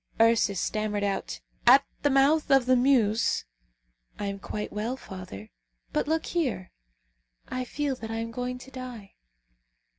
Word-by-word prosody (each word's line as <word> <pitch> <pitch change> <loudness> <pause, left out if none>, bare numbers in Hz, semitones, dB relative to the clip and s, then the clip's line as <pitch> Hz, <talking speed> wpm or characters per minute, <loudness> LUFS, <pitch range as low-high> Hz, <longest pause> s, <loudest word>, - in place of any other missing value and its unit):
Ursus 225 -4 +4
stammered 210 +1 -1
out, 200 -1 -2 0.3
"At 265 +3 +8 0.2
the 290 - +3
mouth 280 +3 +3
of 270 -3 +5
the 255 0 +4
Meuse 245 -4 +3 0.4
" - - -41
"I 205 - -2
am 200 0 -3
quite 210 +2 -5
well, 225 +5 -2
father; 180 - -9 0.4
but - - 0
look 320 +1 0
here! 255 - -2 0.8
I 255 0 -3
feel 285 +2 -2
that 225 - -7
I 225 - -3
am 230 0 -3
going 250 +2 -3
to 260 +2 -13
die!" 250 -6 -8
230 Hz, 155 wpm, -27 LUFS, 205-265 Hz, 0.8 s, At